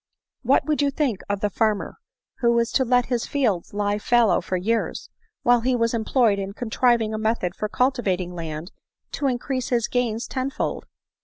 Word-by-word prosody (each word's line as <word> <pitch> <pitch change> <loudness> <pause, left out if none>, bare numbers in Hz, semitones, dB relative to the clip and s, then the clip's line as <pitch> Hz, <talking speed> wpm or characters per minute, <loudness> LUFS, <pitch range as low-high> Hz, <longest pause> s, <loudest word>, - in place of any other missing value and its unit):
What - - +3
would 300 -1 +1
you 285 - +3
think 275 -8 -1
of 200 0 -1
the 210 - +1
farmer 215 -2 0 0.4
who 235 -1 +3
was 235 0 +1
to 265 - +2
let 245 0 +3
his 245 -2 -2
fields 225 -12 0
lie 205 0 -1
fallow 225 -5 +3
for 185 +1 -2
years, 225 +6 -2 0.3
while 245 -2 +4
he 250 +2 +1
was 230 -1 +1
employed 225 -2 +2
in 195 0 -4
contriving 230 -1 +1
a 215 - -2
method 220 -5 0
of 210 0 -2
cultivating 195 -9 0
land 165 0 -6 0.4
to 280 - -1
increase 255 0 -2
his 235 -3 +1
gains 235 -2 -1
ten 260 0 -2
fold?" - - -3
230 Hz, 180 wpm, -23 LUFS, 205-250 Hz, 0.4 s, while